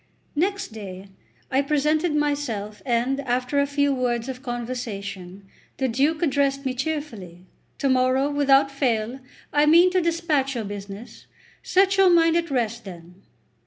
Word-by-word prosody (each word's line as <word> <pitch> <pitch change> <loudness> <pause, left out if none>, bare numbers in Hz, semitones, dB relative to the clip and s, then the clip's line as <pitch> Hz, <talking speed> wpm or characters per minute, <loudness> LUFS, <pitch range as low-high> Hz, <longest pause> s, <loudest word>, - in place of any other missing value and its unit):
XCV 295 - -8
NEXT 400 +2 -1
day 195 -2 -9 0.4
I 265 +1 +3
presented 300 +3 +1
myself, 280 -9 -2
and, 245 +3 +1
after 255 +1 -1
a 280 - +2
few 285 0 +1
words 245 -2 -1
of 260 -1 -6
conversation, 205 -7 -6 0.3
the 265 - 0
Duke 285 +7 +1
addressed 275 -2 +1
me 260 - 0
cheerfully; 245 - -5 0.3
"To 275 - 0
morrow, 260 +1 +2
without 275 -1 +3
fail, 245 -3 -1 0.3
I 295 +1 +4
mean 340 +4 +6
to 370 0 +2
despatch 325 -5 0
your 230 - -2
business; 200 +2 -9 0.3
set 385 +1 +2
your 385 -1 +6
mind 330 -1 +4
at 335 -1 0
rest, 235 -3 -1
then." 180 -1 -12
270 Hz, 150 wpm, -24 LUFS, 230-295 Hz, 0.4 s, mean